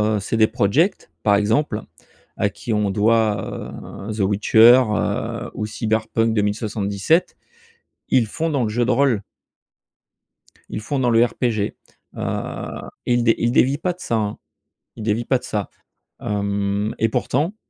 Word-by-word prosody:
heu, -, -, 0 dB
CD 110 Hz, +3 st, +2 dB
Project, 155 Hz, -, +1 dB
par 100 Hz, -1 st, +4 dB
exemple, 110 Hz, +3 st, +1 dB, 0.5 s
à -, -, +1 dB
qui 120 Hz, -, -7 dB
on 105 Hz, -2 st, +1 dB
doit, 105 Hz, 0 st, 0 dB, 0.4 s
heu, -, -, -2 dB
The 110 Hz, -, -7 dB
Witcher, 110 Hz, +5 st, +6 dB
heu, 105 Hz, -, -2 dB
ou 105 Hz, -, -3 dB
Cyberpunk 110 Hz, +1 st, 0 dB
2077. 105 Hz, -, 0 dB, 0.8 s
Ils 125 Hz, -3 st, +4 dB
font 165 Hz, +9 st, -2 dB
dans 140 Hz, -5 st, 0 dB
le -, -, -1 dB
jeu 120 Hz, +3 st, +1 dB
de 120 Hz, -, 0 dB
rôle. 125 Hz, -4 st, +2 dB, 1.5 s
Ils 105 Hz, -, -4 dB
font 135 Hz, +5 st, -2 dB
dans 125 Hz, -, +2 dB
le 115 Hz, 0 st, +5 dB
RPG, 115 Hz, -3 st, -1 dB, 0.4 s
heu, -, -, -4 dB, 0.2 s
ils 120 Hz, -1 st, +2 dB
dé 115 Hz, -1 st, +4 dB
ils 120 Hz, -, +1 dB
dévient 135 Hz, +3 st, +3 dB
pas 180 Hz, +3 st, -1 dB
de 180 Hz, -, -24 dB
ça, 115 Hz, -, -2 dB
hein, 105 Hz, -2 st, -1 dB, 0.6 s
ils -, -, -7 dB
dévient 110 Hz, +2 st, 0 dB
pas 130 Hz, -, +2 dB
de -, -, -17 dB
ça. 105 Hz, -2 st, -3 dB, 0.5 s
Hem, 100 Hz, 0 st, -1 dB
et 115 Hz, -, +2 dB
pourtant 145 Hz, -, -1 dB
110 Hz, 155 wpm, -21 LUFS, 105-120 Hz, 1.5 s, Witcher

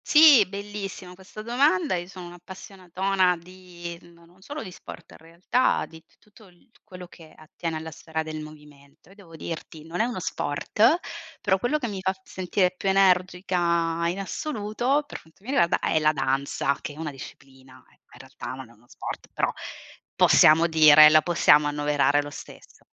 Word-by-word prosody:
Sì, 300 Hz, -8 st, +7 dB
bellissima 200 Hz, -2 st, -7 dB
questa 190 Hz, +3 st, -12 dB
domanda. 235 Hz, -6 st, +1 dB
Io 175 Hz, 0 st, -5 dB
sono 185 Hz, -1 st, -10 dB
un'appassionatona 185 Hz, +1 st, -2 dB
di 175 Hz, -1 st, -11 dB
no 170 Hz, 0 st, -20 dB
non 175 Hz, +3 st, -24 dB
solo 290 Hz, +7 st, -7 dB
di 190 Hz, -, -9 dB
sport -, -, -12 dB
in -, -, -14 dB
realtà, 170 Hz, +10 st, -1 dB
di 160 Hz, 0 st, -15 dB
t -, -, -33 dB
tutto 210 Hz, 0 st, -21 dB
il 180 Hz, +7 st, -25 dB
quello 180 Hz, -3 st, -11 dB
che 165 Hz, -3 st, -16 dB
attiene 165 Hz, 0 st, -7 dB
alla 160 Hz, +1 st, -7 dB
sfera 160 Hz, +1 st, -5 dB
del 155 Hz, 0 st, -6 dB
movimento. 150 Hz, -1 st, -15 dB
Io 195 Hz, -, -18 dB
devo 180 Hz, -5 st, -15 dB
dirti 160 Hz, -1 st, -8 dB
non 165 Hz, +2 st, -6 dB
è -, -, +2 dB
uno 240 Hz, -5 st, -4 dB
sport, 210 Hz, -, 0 dB, 0.4 s
però 190 Hz, -1 st, +1 dB
quello 245 Hz, +9 st, 0 dB
che 265 Hz, -5 st, -4 dB
mi 200 Hz, -3 st, -6 dB
fa 190 Hz, 0 st, 0 dB
sentire 185 Hz, 0 st, -1 dB
più 195 Hz, -, -2 dB
energica 180 Hz, -3 st, +1 dB
in 175 Hz, +3 st, -3 dB
assoluto, 240 Hz, +4 st, -2 dB
per 290 Hz, -, -9 dB
quanto 160 Hz, +4 st, -25 dB
mi 250 Hz, -, -6 dB
riguarda, 170 Hz, -11 st, +2 dB
è 160 Hz, -, 0 dB
la 155 Hz, 0 st, +2 dB
danza, 140 Hz, +1 st, -1 dB
che 145 Hz, -, -7 dB
è -, -, -16 dB
una 155 Hz, -2 st, -5 dB
disciplina, 130 Hz, -1 st, -14 dB
in -, -, -27 dB, 0.2 s
realtà -, -, -9 dB
non 130 Hz, -2 st, -10 dB
è -, -, -18 dB
uno 120 Hz, +2 st, -26 dB
sport, -, -, -8 dB
però -, -, -1 dB, 0.6 s
possiamo 160 Hz, +2 st, +5 dB
dire 155 Hz, -2 st, +8 dB
la 155 Hz, 0 st, +5 dB
possiamo 150 Hz, -3 st, +4 dB
annoverare 145 Hz, 0 st, +1 dB
lo 145 Hz, -, -9 dB
stesso. -, -, -13 dB
175 Hz, 180 wpm, -25 LUFS, 155-195 Hz, 0.6 s, dire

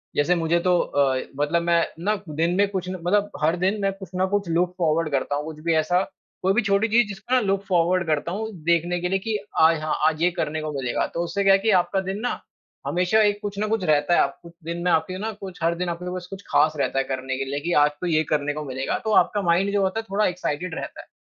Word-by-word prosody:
जैसे 170 Hz, +5 st, +3 dB
मुझे 165 Hz, 0 st, +1 dB
तो 180 Hz, +1 st, +2 dB
अ, 135 Hz, -2 st, +1 dB, 0.2 s
मतलब 155 Hz, +4 st, +1 dB
मैं 170 Hz, 0 st, +3 dB, 0.2 s
ना 210 Hz, +2 st, +2 dB
दिन 165 Hz, +4 st, 0 dB
में 200 Hz, +1 st, +3 dB
कुछ 185 Hz, -2 st, -3 dB
न 185 Hz, -, -4 dB
मतलब 205 Hz, +2 st, +2 dB
हर 160 Hz, +3 st, +3 dB
दिन 205 Hz, +2 st, 0 dB
मैं 195 Hz, 0 st, +1 dB
कुछ 190 Hz, -1 st, -10 dB
ना 185 Hz, +1 st, +2 dB
कुछ 200 Hz, -4 st, -1 dB
लुक 175 Hz, +2 st, +1 dB
फॉरवर्ड 165 Hz, -1 st, +1 dB
करता 140 Hz, +1 st, 0 dB
हूँ, 145 Hz, -, -2 dB
कुछ 155 Hz, -1 st, -8 dB
भी 165 Hz, -, +3 dB
ऐसा 170 Hz, +4 st, +2 dB, 0.4 s
कोई 190 Hz, +1 st, +2 dB
भी 240 Hz, -, +3 dB
छोटी 200 Hz, +1 st, +2 dB
चीज़ 235 Hz, +1 st, +3 dB
जिसको 210 Hz, +5 st, -6 dB
ना 255 Hz, -, +6 dB
लुक 195 Hz, -2 st, 0 dB
फॉरवर्ड 180 Hz, 0 st, +2 dB
करता 155 Hz, +2 st, 0 dB
हूँ 220 Hz, +4 st, -3 dB
देखने 170 Hz, +2 st, +1 dB
के 180 Hz, -, -1 dB
लिए 195 Hz, +1 st, +1 dB
कि 220 Hz, +1 st, -2 dB, 0.2 s
आय 160 Hz, +1 st, +6 dB
हाँ, 155 Hz, 0 st, -2 dB
आज 160 Hz, 0 st, 0 dB
ये 175 Hz, -, +5 dB
करने 155 Hz, -3 st, -2 dB
को 155 Hz, 0 st, -4 dB
मिलेगा। 130 Hz, -3 st, -1 dB
तो 170 Hz, -, -1 dB
उससे 175 Hz, +4 st, -2 dB
क्या 195 Hz, 0 st, +6 dB
है 195 Hz, -, +5 dB
कि 220 Hz, -, 0 dB
आपका 195 Hz, +2 st, -1 dB
दिन 190 Hz, +2 st, -4 dB
ना 245 Hz, -, -2 dB, 0.5 s
हमेशा 180 Hz, +5 st, +2 dB
एक 205 Hz, -1 st, +2 dB
कुछ 205 Hz, -1 st, -5 dB
ना 215 Hz, -, 0 dB
कुछ 220 Hz, -3 st, 0 dB
रहता 150 Hz, +1 st, +3 dB
है -, -, +5 dB
आपको, 140 Hz, +5 st, -3 dB
दिन 170 Hz, +2 st, -4 dB
में 180 Hz, -, +2 dB
आपके 165 Hz, +3 st, +1 dB
ना 220 Hz, +3 st, -3 dB
कुछ 195 Hz, -3 st, -10 dB
हर 170 Hz, +1 st, +2 dB
दिन 180 Hz, 0 st, -2 dB
आप 170 Hz, 0 st, -4 dB
लोगों 180 Hz, 0 st, -4 dB
के -, -, -2 dB
पास 180 Hz, -, -12 dB
कुछ 195 Hz, 0 st, -8 dB
खास 155 Hz, +1 st, +4 dB
रहता 135 Hz, -, 0 dB
है -, -, +2 dB
करने 130 Hz, 0 st, -3 dB
के 135 Hz, -, -2 dB
लिए 140 Hz, +2 st, -3 dB
कि 170 Hz, +4 st, -3 dB
आज 150 Hz, -, +3 dB
तो 180 Hz, -, -1 dB
ये 155 Hz, -2 st, +2 dB
करने 145 Hz, -1 st, 0 dB
को 150 Hz, +1 st, -5 dB
मिलेगा। 135 Hz, 0 st, -2 dB
तो 220 Hz, -, 0 dB
आपका 205 Hz, -, -3 dB
माइंड 180 Hz, +2 st, +2 dB
जो 205 Hz, -, +2 dB
होता 190 Hz, +3 st, 0 dB
है -, -, -4 dB
थोड़ा 205 Hz, +2 st, +1 dB
एक्साइटेड 180 Hz, -1 st, -2 dB
रहता -, -, -6 dB
है। -, -, -20 dB
175 Hz, 275 wpm, -24 LUFS, 155-195 Hz, 0.5 s, ना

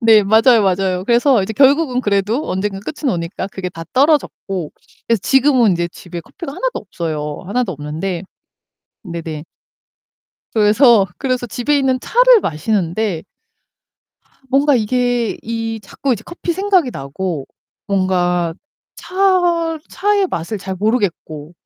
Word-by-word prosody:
네, 225 Hz, -3 st, +6 dB
맞아요, 220 Hz, +3 st, +5 dB
맞아요. 185 Hz, -1 st, 0 dB
그래서 240 Hz, -1 st, +3 dB
이제 220 Hz, -, -3 dB
결국은 275 Hz, +1 st, +3 dB
그래도 205 Hz, +5 st, 0 dB
언젠가 195 Hz, +1 st, -2 dB
끝은 280 Hz, +3 st, -3 dB
오니까 170 Hz, +2 st, -4 dB
그게 190 Hz, -1 st, -5 dB
다 165 Hz, -2 st, -9 dB
떨어졌고 260 Hz, -, +1 dB, 0.4 s
그래서 230 Hz, -2 st, +3 dB
지금은 260 Hz, -6 st, +4 dB
이제 170 Hz, 0 st, -1 dB
집에 175 Hz, -1 st, -8 dB
커피가 275 Hz, -, -9 dB
하나도 -, -, -2 dB
없어요. 155 Hz, -5 st, -5 dB
하나도 215 Hz, -1 st, -1 dB
없는데 160 Hz, +5 st, -4 dB, 0.8 s
네네 165 Hz, -4 st, -6 dB, 1.1 s
그래서, 215 Hz, 0 st, +5 dB
그래서 255 Hz, -3 st, -1 dB
집에 250 Hz, +7 st, 0 dB
있는 260 Hz, -2 st, +1 dB
차를 -, -, +5 dB
마시는데 180 Hz, -, -1 dB, 1.1 s
아 -, -, -34 dB
뭔가 280 Hz, +1 st, +4 dB
이게 245 Hz, 0 st, 0 dB
이 225 Hz, 0 st, -4 dB
자꾸 260 Hz, +6 st, -2 dB
이제 225 Hz, -2 st, -3 dB
커피 345 Hz, 0 st, -4 dB
생각이 375 Hz, -7 st, +2 dB
나고 145 Hz, +2 st, -4 dB, 0.4 s
뭔가 180 Hz, -3 st, 0 dB, 0.4 s
차, 355 Hz, -4 st, +1 dB
차의 410 Hz, -1 st, +1 dB
맛을 185 Hz, -, -4 dB
잘 190 Hz, 0 st, -5 dB
모르겠고 175 Hz, -8 st, -2 dB
215 Hz, 290 characters per minute, -18 LUFS, 180-270 Hz, 1.1 s, 네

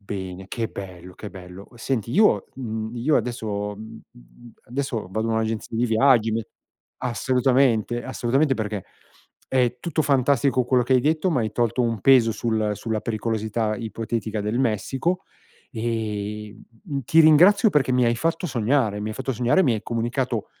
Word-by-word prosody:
bene, 95 Hz, -2 st, -6 dB
che 115 Hz, -2 st, -3 dB
bello, 90 Hz, -2 st, -9 dB
che 105 Hz, -, -9 dB
bello. 90 Hz, +1 st, -11 dB
Cu 120 Hz, -, -19 dB
senti, 115 Hz, -2 st, -2 dB
io 210 Hz, +2 st, +4 dB
mhmm, 110 Hz, -3 st, -4 dB
io 140 Hz, +6 st, +2 dB
adesso 105 Hz, -4 st, -3 dB
mh -, -, -11 dB
mh 110 Hz, 0 st, -10 dB
mhmm, -, -, -17 dB, 0.2 s
adesso, 130 Hz, -2 st, -2 dB
vado 110 Hz, +3 st, -2 dB
in -, -, 0 dB
un'agenzia 110 Hz, 0 st, -2 dB
di 120 Hz, -, +2 dB
viaggi, 115 Hz, -1 st, +4 dB
me 115 Hz, 0 st, -1 dB, 0.5 s
assolutamente, 125 Hz, -1 st, +1 dB
assolutamente 135 Hz, +3 st, +1 dB
perché, 105 Hz, -4 st, -4 dB, 0.6 s
è 125 Hz, -1 st, +1 dB
tutto 160 Hz, -2 st, -1 dB
fantastico 135 Hz, -2 st, +2 dB
quello 125 Hz, 0 st, +2 dB
che 125 Hz, +2 st, 0 dB
hai 130 Hz, -, +5 dB
detto, 155 Hz, +6 st, +1 dB
m'hai 110 Hz, -8 st, 0 dB
tolto 120 Hz, +1 st, 0 dB
un 115 Hz, -3 st, -1 dB
peso 120 Hz, -1 st, +5 dB
sul 110 Hz, -2 st, -1 dB
sulla 110 Hz, 0 st, -3 dB
pericolosità 110 Hz, -1 st, -2 dB
ipotetica 110 Hz, -1 st, -4 dB
del 105 Hz, +4 st, -2 dB
Messico, 135 Hz, -, -1 dB, 0.5 s
e, 105 Hz, -3 st, -4 dB
mh 115 Hz, +5 st, -19 dB
mhmm, 140 Hz, -, 0 dB
ti 160 Hz, +7 st, +5 dB
ringrazio, 180 Hz, +9 st, +6 dB
perché 135 Hz, -5 st, +2 dB
mi 125 Hz, 0 st, +3 dB
hai 115 Hz, -, +1 dB
fatto 165 Hz, +7 st, -1 dB
sognare, 115 Hz, -4 st, 0 dB
mi 105 Hz, -, -3 dB
hai 110 Hz, -, -6 dB
fatto 135 Hz, 0 st, -3 dB
sognare, 125 Hz, -, +3 dB
mi 125 Hz, -6 st, +2 dB
hai 105 Hz, -, -4 dB
comunicato, 120 Hz, 0 st, -2 dB
115 Hz, 170 wpm, -23 LUFS, 110-130 Hz, 0.6 s, ringrazio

